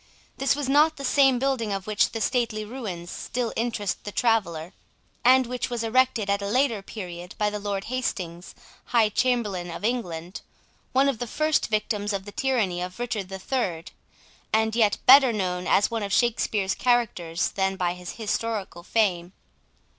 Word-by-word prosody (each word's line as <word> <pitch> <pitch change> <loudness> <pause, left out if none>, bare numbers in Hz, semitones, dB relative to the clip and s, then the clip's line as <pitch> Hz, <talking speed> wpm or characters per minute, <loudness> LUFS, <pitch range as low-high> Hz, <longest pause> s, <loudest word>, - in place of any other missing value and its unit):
This 270 0 +2
was 290 -2 -3
not 300 +3 +4
the 275 - -5
same 270 -1 +4
building 255 -4 0
of 195 -1 -3
which 215 -1 +2
the 225 - -5
stately 220 -3 0
ruins 205 -8 -6
still 245 -2 -3
interest 225 -4 -2
the 205 - -6
traveller, 185 -8 0 0.5
and 260 +1 +6
which 250 +1 -3
was 240 -2 -3
erected 235 -2 +2
at 200 0 +1
a 200 - -3
later 235 -1 +1
period 180 -3 -8
by 210 -1 +1
the 210 - -4
Lord 200 -1 -3
Hastings, 185 -9 -4 0.3
High 230 -3 +3
Chamberlain 210 -7 0
of 170 +4 -5
England, 180 -7 -3 0.5
one 270 +2 +3
of 270 -5 0
the 245 - -3
first 310 +6 +1
victims 210 -1 -1
of 195 -1 -3
the 205 - -8
tyranny 215 -9 0
of 180 +1 -5
Richard 225 -6 -3
the 195 - -5
Third, 190 -6 -3 0.6
and 220 0 +2
yet 215 -3 +3
better 265 -1 +8
known 180 -4 -2
as 200 - +3
one 230 -1 -2
of 200 -1 -4
Shakespeare's 215 -4 +1
characters 210 -9 0
than 190 0 -1
by 180 -2 0
his 180 0 -8
historical 215 -4 -3
fame. 180 -3 0
215 Hz, 170 wpm, -25 LUFS, 190-245 Hz, 0.6 s, better